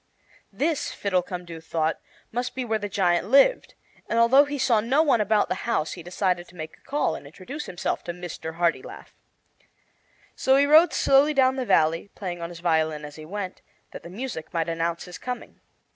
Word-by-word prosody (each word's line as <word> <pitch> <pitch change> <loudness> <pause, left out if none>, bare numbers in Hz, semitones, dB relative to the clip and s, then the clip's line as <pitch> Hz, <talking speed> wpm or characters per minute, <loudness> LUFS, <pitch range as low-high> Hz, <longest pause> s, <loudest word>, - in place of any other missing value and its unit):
This, 310 0 -1
Fiddlecumdoo 180 -3 -3
thought, 160 -1 -1 0.3
must 245 +2 -3
be 260 -1 -3
where 220 -2 0
the 205 0 -4
giant 180 -2 +1
lived; 280 - +4 0.3
and, 230 - 0
although 255 +5 +6
he 290 0 -4
saw 255 -4 +3
no 265 +8 +3
one 260 -8 +3
about 210 0 +2
the - - -4
house, 155 -9 0
he 175 - -8
decided 180 0 -1
to 175 - -18
make 155 -2 -7
a - - -31
call 290 -1 -1
and - - -8
introduce 200 - -8
himself 175 - -3
to 175 - -3
Mr. 170 -2 -7
Hartilaf. 170 0 -2 1.2
So 265 - +3
he 280 +1 +5
rode 315 +4 +6
slowly 285 +3 +4
down 260 -1 +4
the 260 -2 -3
valley, 165 +5 +2
playing 175 -3 -5
on 170 - -4
his 170 -1 -10
violin 160 -3 +1
as 150 0 -10
he 155 - -10
went, 190 +2 -6 0.3
that - - -9
the - - -11
music 210 -4 -6
might 165 -1 -1
announce 165 0 -2
his 180 - -10
coming. 250 -1 -6
190 Hz, 190 wpm, -25 LUFS, 170-260 Hz, 1.2 s, although